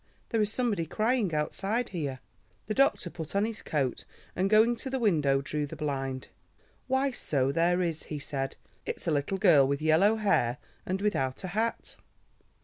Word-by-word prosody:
There 225 -3 +1
is 210 0 +1
somebody 220 -10 0
crying 220 - +1
outside 195 +10 -1
here." 145 -8 -4 0.4
The 215 - -2
doctor 270 -9 +2
put 160 +1 -7
on 200 +1 +3
his 225 -1 -5
coat, 135 -5 -1 0.3
and, 190 +2 +1
going 220 +3 +5
to 265 - -4
the 265 - -1
window, 150 - +2
drew 150 +1 -2
the 160 - -8
blind. 135 -3 -3 0.6
"Why, 265 +1 +2
so 135 - 0
there 175 +4 +2
is," 165 -2 -3
he 150 - -5
said. 135 -1 -4 0.3
"It's - - -4
a 170 - +1
little 145 +6 0
girl 165 -9 +6
with 140 0 0
yellow 160 +8 +4
hair 195 - +1 0.3
and 190 +2 -2
without 135 -11 0
a 185 - -4
hat." 220 +5 -2
175 Hz, 175 wpm, -29 LUFS, 145-215 Hz, 0.6 s, girl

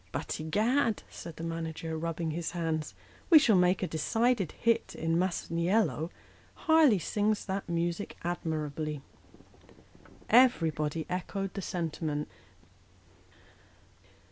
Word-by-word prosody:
" - - -33
But, - - -4
egad," 220 - +1
said 165 -2 -9
the 165 - -8
manager, 165 0 -4
rubbing 165 0 -2
his 165 +1 -3
hands, 160 -3 -2 0.2
" - - -27
we 335 - +10
shall 245 -8 +5
make 180 +1 +3
a - - 0
decided 220 +4 +1
hit 230 -1 0
in 165 0 0
' - - +2
Masaniello.' 175 0 0 0.6
Harleigh 315 -9 +6
sings 210 +4 0
that 195 -2 -4
music 170 +3 -2
admirably." 155 -3 -3 1.2
Everybody 165 - +3
echoed 190 +2 -3
the 200 - -4
sentiment. 160 -4 -3
170 Hz, 115 wpm, -30 LUFS, 160-205 Hz, 1.2 s, we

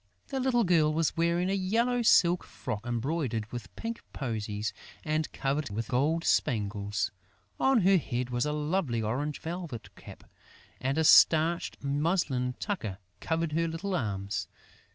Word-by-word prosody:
The 270 - -2
little 250 -2 +2
girl 165 -5 +3
was 160 0 0
wearing 170 +3 +1
a - - +1
yellow 230 +6 +1
silk 180 -6 +5
frock 105 +2 -6
embroidered 120 -2 -1
with 120 -3 -8
pink 230 0 -5
posies 110 -4 -3 0.3
and 155 0 -1
covered 140 0 -1
with 110 +3 -4
gold 150 +7 +1
spangles. 105 - 0 0.5
On 265 -4 +4
her 190 +1 +5
head 125 -5 -3
was 120 +3 0
a - - 0
lovely 150 -6 -1
orange 140 +7 -2
velvet 165 -7 -6
cap; - - -12 0.6
and 135 +3 -1
a 160 - +3
starched 160 +1 +5
muslin 140 -4 0
tucker 115 - -3 0.2
covered 165 -1 -1
her 165 +2 +1
little 170 +5 -3
arms. 100 - -2
150 Hz, 145 wpm, -29 LUFS, 120-175 Hz, 0.6 s, silk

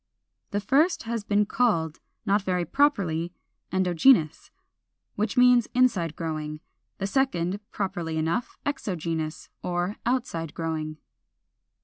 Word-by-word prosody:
The 205 - -1
first 280 - +2
has 230 -1 -3
been 210 0 +2
called, 170 -10 +1 0.3
not 205 +1 +3
very 180 -2 0
properly, 175 - +1 0.4
Endogenous, 180 - +3 0.6
which 215 +4 -2
means 250 -2 +6
inside 195 -11 +2
growing; 155 -2 -4 0.4
the 195 - -2
second, 200 -6 0
properly 175 -5 -3
enough, 165 +9 -1
Exogenous, 165 - -3
or 180 +3 -2
outside 235 - -1
growing. 155 -2 -3
185 Hz, 105 wpm, -26 LUFS, 165-230 Hz, 0.6 s, means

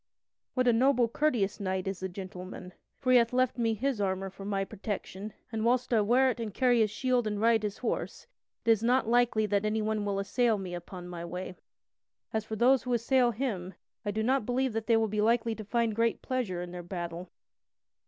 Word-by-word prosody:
what 255 -1 +2
a 240 - +6
noble, 250 0 +4
courteous 230 -6 0
knight 190 -1 -2
is 195 -1 -3
the 190 - -3
gentleman. 185 0 -8 0.2
For 255 - 0
he 250 - +8
hath 235 -1 +1
left 255 -1 +1
me 225 -1 +1
his 250 0 -1
armor 190 0 -1
for 195 +1 -11
my 195 -1 -1
protection, 205 0 -5 0.2
and 220 -1 -2
whilst 245 +1 +1
I 220 - +5
wear 255 +5 +4
it 245 - -7
and 225 -2 -3
carry 245 +2 +3
his 215 -1 +3
shield 245 +2 0
and 210 -1 -2
ride 225 0 +4
his 210 -2 -3
horse, 250 - -3 0.4
it 230 - +5
is 220 -2 +3
not 245 +1 +2
likely 235 -2 +3
that 205 -1 +1
anyone 215 0 0
will 200 -1 -1
assail 220 +3 +1
me 185 -2 -6
upon 175 +1 -7
my 175 -1 -6
way. 180 +2 -6 0.8
As 220 -1 0
for 220 - -4
those 255 +4 +4
who 250 - -2
assail 245 +1 +3
him, 200 -7 -3 0.3
I 205 - -2
do 215 +2 -1
not 260 +2 +2
believe 250 +2 0
that 225 0 -3
they 230 -2 +5
will 225 0 +2
be 210 0 -1
likely 230 +1 +2
to 220 - -7
find 230 +1 0
great 230 0 +1
pleasure 215 -9 -2
in 175 - -8
their 180 0 -6
battle." 175 0 -6
220 Hz, 215 wpm, -30 LUFS, 195-240 Hz, 0.8 s, he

